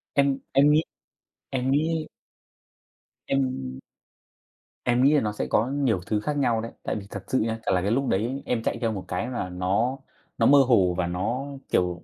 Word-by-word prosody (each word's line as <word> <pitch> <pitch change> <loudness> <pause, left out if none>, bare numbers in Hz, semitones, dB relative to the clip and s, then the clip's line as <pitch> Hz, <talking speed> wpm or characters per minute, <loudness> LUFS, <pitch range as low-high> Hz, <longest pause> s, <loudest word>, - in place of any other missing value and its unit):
Em 140 -1 +3
em 140 +2 +6
nghĩ 155 - +5 0.7
em 130 0 -1
nghĩ 155 +3 +1 1.2
Em 130 - -1 1.0
Em 125 +1 +2
nghĩ 140 - +5
là 150 - +4
nó 105 - -1
sẽ 105 - -3
có 110 +3 +2
nhiều 135 -7 +1
thứ 105 -1 0
khác 145 +7 -2
nhau 120 -5 +2
đấy. 115 - -6
Tại - - -2
vì 100 -2 -6
thật - - -7
sự 130 - +1
nhá, 115 0 -1
chả - - +1
là 90 - +2
cái 100 +3 0
lúc 135 +3 +1
đấy 120 +8 0
em 120 -2 0
chạy - - -1
theo 115 -2 +1
một 100 -4 -5
cái 90 +4 -2
là 105 -7 -3
nó 95 +9 0 0.4
nó - - +3
mơ 140 0 +7
hồ 95 -8 +4
và 90 - 0
nó, 110 +10 -2 0.2
kiểu, 90 -1 0
120 Hz, 200 wpm, -25 LUFS, 100-135 Hz, 1.2 s, mơ